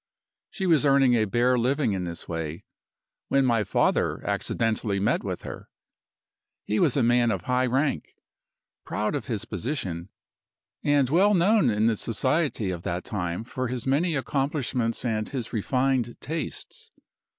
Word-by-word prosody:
"She 190 - -4
was 165 -5 +4
earning 135 -3 +4
a 110 -2 +3
bare 120 +4 +2
living 130 -1 +1
in 95 -2 -2
this 85 -1 -6
way, 80 -1 -4 0.6
when 135 -1 +3
my 115 -3 +2
father 100 - +1
accidentally 110 -3 0
met 100 - +1
with - - -4
her. - - -8 1.0
He 105 - 0
was - - +3
a 135 - +3
man 120 0 +3
of - - -1
high 125 0 +1
rank, 130 - -1 0.7
proud - - -2
of - - -3
his - - -2
position, 100 - -4 0.7
and 145 -2 +3
well 200 +5 +4
known 185 - +4
in 105 0 +1
the 115 -1 +3
society 130 - 0
of 85 -2 -5
that 90 +1 -3
time 90 -2 -3
for 130 +2 -4
his 125 -1 -4
many 155 +5 +1
accomplishments 130 -2 -1
and 110 -2 -1
his 130 -4 -5
refined 125 +2 0
tastes. 155 -1 -5
125 Hz, 150 wpm, -26 LUFS, 110-140 Hz, 1.0 s, was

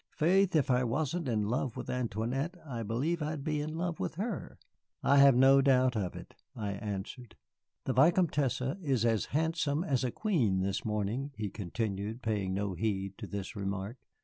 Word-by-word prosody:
Faith, 185 +3 +3
if 145 -4 +3
I 125 0 +3
wasn't 150 +6 -1
in 110 -4 +1
love 120 +3 -1
with - - -5
Antoinette, 125 - -2
I 120 -6 -5
believe 130 +10 -1
I'd 150 -1 -3
be 150 -1 -1
in 155 +2 -4
love 175 -1 -2
with - - -3
her." 205 +1 -4 0.5
"I 140 - +4
have 140 -2 +8
no 135 +2 +6
doubt 130 -2 +3
of 95 -5 -2
it," - - -10 0.2
I 105 -3 -3
answered. 105 +4 -6 0.5
"The 130 - -1
Vicomtesse 145 -3 +3 0.2
is 135 - +1
as 115 -2 +2
handsome 160 0 0
as 135 -7 0
a 125 - +1
queen 120 - +1
this 95 +1 -1
morning," 110 +6 -2
he 105 -3 -4
continued 105 +3 -4
paying 105 -4 -1
no 100 -1 -1
heed 95 0 -2
to - - -6
this 100 +3 -5
remark. 100 +3 -4
125 Hz, 175 wpm, -31 LUFS, 105-150 Hz, 0.5 s, have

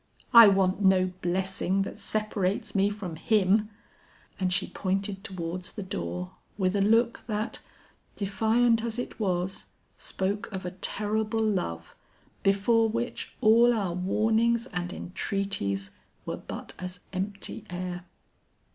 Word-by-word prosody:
'I 230 -2 +11
want 195 0 +3
no 185 -1 +4
blessing 190 +2 0
that - - -7
separates 210 -1 -1
me 200 0 +3
from 195 -6 -6
him!' 210 +2 +3 0.7
And 185 -1 +1
she 180 - +1
pointed 195 0 -2
towards 180 -2 -5
the 205 - -5
door 90 - -4 0.3
with 185 -1 +1
a 200 - +2
look 230 +3 +3
that, 215 0 -2 0.6
defiant 225 +3 +2
as 230 -1 -3
it 245 - -5
was, 185 -2 -1 0.3
spoke 205 +4 -2
of 190 -2 -5
a 180 - -3
terrible 215 +3 0
love 85 - -2 0.5
before 220 +3 +3
which 235 +2 -3
all 230 +1 +6
our 195 -5 -1
warnings 220 +6 +2
and 180 0 -2
entreaties 140 - -2 0.3
were - - -3
but - - -8
as 180 0 -6
empty 195 +1 -4
air. 180 0 -5
195 Hz, 130 wpm, -28 LUFS, 185-220 Hz, 0.7 s, I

